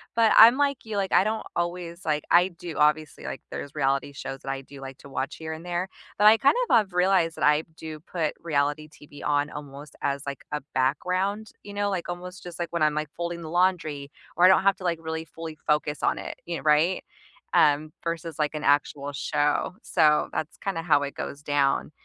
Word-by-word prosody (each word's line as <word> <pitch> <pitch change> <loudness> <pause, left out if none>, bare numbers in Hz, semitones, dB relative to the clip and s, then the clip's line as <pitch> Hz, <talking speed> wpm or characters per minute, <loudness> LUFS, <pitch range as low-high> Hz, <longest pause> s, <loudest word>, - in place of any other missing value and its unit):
but 225 -1 +4
I'm 235 +4 +9
like 280 -2 +1
you, 220 -2 -5
like, 195 -1 -1
I - - +6
don't 220 +1 -2
always 175 0 -3
like, 150 -1 0
I 175 +1 +6
do 170 -2 -8
obviously 150 0 +1
like - - -5
there's 140 +1 -6
reality 140 -1 0
shows 135 0 -6
that 135 - -7
I 135 - -4
do 135 0 -13
like 135 0 -8
to - - -14
watch 135 0 -3
here 160 0 -5
and 160 +2 -9
there, 175 +1 -2 0.3
but 210 - +3
I 220 - +9
kind 275 - +4
of - - +5
have 210 -5 +3
realized 180 -2 +2
that - - -3
I 150 +1 +5 0.2
do 155 -1 -7
put 160 -3 -2
reality 150 -1 -1
TV 145 -1 -14
on 145 0 +1
almost 145 0 -9
as, 140 0 -1
like, 140 -1 -6
a 150 - -2
background, 185 +11 0
you 205 0 -10
know, 205 0 0
like, 175 -2 -3
almost 180 +1 -7
just 175 -2 -9
like 170 -1 -4
when 170 - -1
I'm, 150 -1 +3
like, 155 -1 -2
folding 170 0 -4
the 155 - -7
laundry, 160 -5 0 0.2
or 175 - +2
I - - +10
don't 190 0 +5
have 195 -1 +4
to, - - -11
like, 175 -2 0
really 160 0 -4
fully 165 -1 -8
focus 150 -1 +1
on - - +1
it, - - -5
you 170 -1 -2
know, - - -9
right? 155 +4 +3 0.5
Um, 150 +1 +3
versus, 165 -2 -4
like, 150 0 0
an 150 - -4
actual 145 0 +1
show, 145 +4 0
so 155 -3 +3
that's 155 - -4
kinda 190 -5 -3
how 150 -4 +4
it 140 - -5
goes 140 - -6
down. 145 0 +1
160 Hz, 225 wpm, -26 LUFS, 145-180 Hz, 0.5 s, I